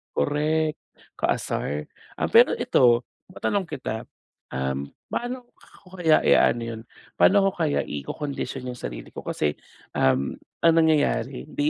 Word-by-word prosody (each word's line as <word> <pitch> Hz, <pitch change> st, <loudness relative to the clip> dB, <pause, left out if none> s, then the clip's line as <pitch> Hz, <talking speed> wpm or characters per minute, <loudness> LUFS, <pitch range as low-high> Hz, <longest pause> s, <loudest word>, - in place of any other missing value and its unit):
correct, 155 Hz, -, +1 dB, 0.4 s
kaasar. 75 Hz, +1 st, -1 dB, 0.3 s
Ah, -, -, 0 dB
pero -, -, +7 dB
ito 120 Hz, -1 st, +4 dB, 0.3 s
matanong 190 Hz, 0 st, -1 dB
kita, 110 Hz, -3 st, -5 dB, 1.0 s
paano 245 Hz, +1 st, -2 dB, 0.5 s
ko 185 Hz, 0 st, -13 dB
kaya 160 Hz, -3 st, +4 dB
i-aano 120 Hz, -, +4 dB
'yon, 115 Hz, -1 st, -5 dB, 0.4 s
paano 200 Hz, +1 st, +6 dB
ako 195 Hz, -, +4 dB
kaya 150 Hz, -2 st, +1 dB
ikokondisyon 130 Hz, -, -5 dB
yung 125 Hz, -, -10 dB
sarili -, -, -7 dB
ko -, -, -7 dB
kasi, 75 Hz, -1 st, -1 dB, 0.4 s
um, 65 Hz, +1 st, +2 dB, 0.3 s
ang 165 Hz, -1 st, +6 dB
nangyayari 145 Hz, -5 st, +2 dB
di 145 Hz, 0 st, 0 dB
145 Hz, 125 wpm, -25 LUFS, 115-160 Hz, 1.0 s, pero